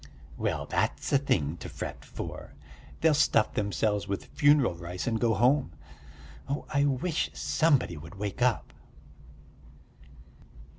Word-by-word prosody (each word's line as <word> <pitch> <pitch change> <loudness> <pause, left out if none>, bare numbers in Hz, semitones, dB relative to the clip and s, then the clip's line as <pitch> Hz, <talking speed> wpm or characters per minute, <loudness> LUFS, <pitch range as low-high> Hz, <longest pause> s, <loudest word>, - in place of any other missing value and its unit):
"Well, - - -2
that's - - -1
a 140 - +6
thing 85 - 0
to - - -8
fret - - -6
for! - - -8 0.5
They'll 160 -1 +5
stuff 115 -6 +3
themselves 105 0 0
with 100 -1 -4
funeral 145 - +4
rice 85 +1 -6
and 115 -2 -1
go 115 -2 +3
home.... 125 - +2 0.8
Oh, 140 - -2
I 140 0 +3
wish 145 +4 0
somebody 140 - +2
would 80 +5 -10
wake 100 +4 -5
up!" 125 -1 +1
115 Hz, 130 wpm, -28 LUFS, 95-140 Hz, 0.8 s, a